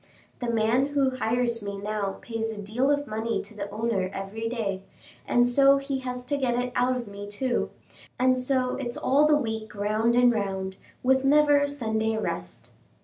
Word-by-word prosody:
The 245 - -2
man 230 +4 +2
who 280 -2 +1
hires 240 -1 0
me 200 -1 -5
now 205 -1 -3
pays 225 -1 -3
a 215 - -7
deal 225 +7 0
of 290 0 +1
money 220 -1 -2
to - - -13
the 210 -1 -5
owner 210 -3 -1
every 210 +4 -4
day, 205 -5 -2 0.5
and 245 0 +4
so 275 +2 +5
he 275 -1 -3
has 250 -1 -5
to 285 +3 0
get 255 -3 0
it 250 0 -2
out 250 +1 +2
of 240 -3 -6
me, 200 0 -8
too; 240 +5 -1 0.5
and 255 0 +3
so 255 0 +1
it's 245 -3 -4
all 285 +3 +3
the 300 -1 +5
week 220 -5 -4
round 215 +3 +1
and 245 0 +5
round, 190 -3 -2 0.3
with 265 +1 +3
never 290 +1 +5
a 285 - +1
Sunday 220 -5 -1
rest." 90 - -5
235 Hz, 190 wpm, -26 LUFS, 215-260 Hz, 0.5 s, so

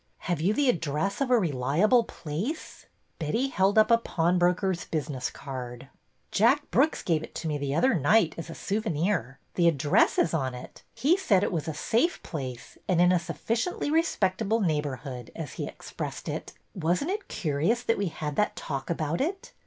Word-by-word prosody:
Have 175 -4 -2
you 185 +5 +3
the 280 +5 +2
address 170 - 0
of 270 - +1
a 250 - +5
reliable 175 - +3
place? 195 - -5
" - - -43
Betty 225 - 0
held 195 -3 +2
up 215 +2 +6
a 230 - +6
pawnbroker's 180 -1 +1
business 145 -5 -2
card. 130 -1 -7 0.4
Jack 260 +8 +3
Brooks 295 +5 +2
gave 160 -3 +1
it - - -10
to 165 - -4
me 150 -2 -1
the 140 0 -2
other 260 +10 +4
night 170 +3 +3
as 165 - -7
a 165 - -7
souvenir. 180 - -1 0.2
The 170 -1 +3
address 150 -2 +3
is - - +2
on 130 -2 -1
it. 125 - -10
He 285 +11 +3
said 205 - +3
it - - 0
was 165 -5 -2
a 160 - -3
safe 290 +11 +1
place 130 -6 -6
and 180 -3 +2
in 180 +1 +6
a 180 - +4
sufficiently 230 - -2
respectable 225 - +1
neighborhood, 140 - -2
as 160 -4 -6
he - - -4
expressed - - -7
it. - - -4 0.2
Was 175 - 0
n't 335 - -2
it 410 +1 -4
curi 155 -1 0
ous 240 +1 -1
that 230 -3 +1
we 200 - 0
had 150 -3 -4
that 210 - +1
talk 135 -3 -5
about 160 - -1
it? 375 +7 -3
175 Hz, 190 wpm, -27 LUFS, 150-225 Hz, 0.4 s, up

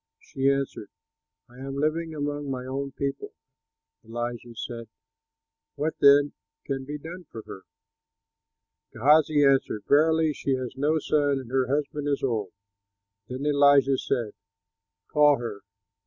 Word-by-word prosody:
'" - - -63
She 135 0 +2
answered, 140 -1 -2 0.6
"I 125 +1 -16
am 135 +1 -6
living 155 +3 -1
among 145 -1 -3
my 130 -1 -4
own 135 +1 -4
people." 140 0 -4 0.7
Elisha 120 +1 -5
said, 115 +1 -6 0.9
"What 155 +2 -1
then 140 +1 +6 0.3
can 135 -1 -3
be 145 +2 -5
done 170 +4 -9
for 115 -6 -10
her?" 95 - -10 1.3
Gehazi 150 +3 +4
answered, 135 -6 +2
"Verily, 160 +1 +4
she 135 -1 -1
has 130 -1 -5
no 150 +4 +1
son, 145 -2 +1
and 125 -2 -10
her 130 -1 +1
husband 145 +1 -2
is 140 -1 -1
old." 110 -8 -1 0.8
Then 130 +3 -5
Elisha 140 -2 +4
said, 120 -6 -2 0.7
"Call 150 -1 +4
her." 115 -4 -6
140 Hz, 135 wpm, -26 LUFS, 130-145 Hz, 1.3 s, then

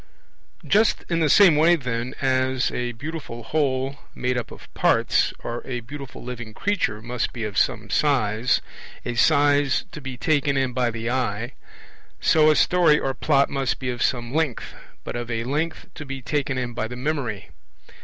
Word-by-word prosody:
Just 215 +2 +2
in 170 - +2
the 155 -2 +2
same 190 -4 +7
way, 165 +3 +5
then, 125 -4 -3
as 130 -1 +1
a 120 0 -3
beautiful 135 -2 -7
whole 135 0 -1 0.2
made 125 0 -1
up 125 - -3
of - - -14
parts, - - +2
or 120 0 -4
a 125 -2 -4
beautiful 135 +2 -9
living 115 -3 -7
creature, 150 - -1
must 120 0 -2
be 115 - -5
of 105 -2 -4
some - - +1
size, 125 -5 +2 0.4
a 120 - -2
size 145 +1 +3
to 150 - -8
be 130 -2 -6
taken 145 -1 +1
in 130 -2 0
by 125 -1 +1
the 115 +1 -3
eye, 120 -2 -1 0.7
so 155 -1 +4
a 155 - +4
story 170 -4 +4
or 135 - -1
Plot 140 0 +2
must 135 -2 -1
be 125 -1 -3
of 120 -1 -6
some 120 0 0
length, 155 -6 -1 0.3
but - - -6
of 120 0 -4
a 115 -1 -2
length 150 +6 -2
to 155 - -8
be 135 -1 -6
taken 140 +1 -2
in 125 -1 -3
by 110 -1 -2
the 125 - -7
memory. 125 -7 -3
130 Hz, 180 wpm, -23 LUFS, 120-145 Hz, 0.7 s, same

